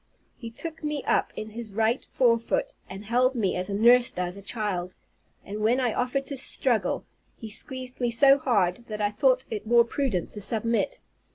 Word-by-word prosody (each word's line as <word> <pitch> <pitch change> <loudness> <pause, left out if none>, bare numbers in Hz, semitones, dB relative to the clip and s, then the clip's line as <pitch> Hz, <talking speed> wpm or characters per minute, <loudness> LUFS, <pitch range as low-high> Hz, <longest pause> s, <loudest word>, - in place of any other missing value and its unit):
He 230 - -8
took 315 +7 -6
me 300 -2 -2
up - - +1
in 215 0 -6
his 220 -2 -8
right 225 +3 +1
forefoot, 250 - +1 0.2
and 195 +2 -8
held 250 +4 +2
me 205 -6 0
as 180 +2 -2
a 200 - -1
nurse 240 +3 +6
does 180 0 -3
a 200 - -10
child; 195 -4 -3 0.5
and 205 +2 -6
when 225 +4 +2
I 245 -4 +1
offered 265 +2 -1
to 280 - -5
struggle, 250 -2 0 0.3
he 220 -2 -8
squeezed 255 +3 -7
me 240 - +2
so 275 +4 +6
hard, 220 -3 0
that 215 -1 -5
I 205 -1 +1
thought 255 +3 +2
it 215 0 -5
more 235 +1 +6
prudent 235 - -2
to 210 - -5
submit. 230 - 0
235 Hz, 190 wpm, -26 LUFS, 210-255 Hz, 0.5 s, nurse